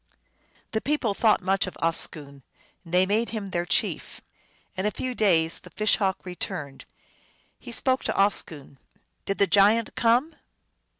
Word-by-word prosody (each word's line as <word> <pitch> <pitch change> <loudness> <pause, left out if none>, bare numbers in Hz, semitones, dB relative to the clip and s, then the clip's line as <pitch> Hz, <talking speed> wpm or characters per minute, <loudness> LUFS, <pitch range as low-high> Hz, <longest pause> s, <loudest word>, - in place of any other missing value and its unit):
The 220 - -1
people 275 -8 0
thought 215 -1 +2
much 195 +1 +1
of 185 - -8
Oscoon. 150 -4 -2 0.4
They 180 +2 +2
made 215 +4 0
him 205 -4 -5
their 175 0 -2
chief. - - -1 0.6
In 190 +2 -1
a - - +3
few 255 +4 -4
days 170 -8 +2
the - - -14
Fish 215 0 +1
Hawk 190 -2 0
re 180 -1 -7
turned. 140 -4 -6 0.7
He - - -10
spoke 260 +2 0
to - - 0
Oscoon: 160 -8 -1 0.2
" - - -47
Did 195 - -1
the 200 - +4
giant 210 +3 +3
come 245 +7 +2
195 Hz, 160 wpm, -25 LUFS, 175-225 Hz, 0.7 s, the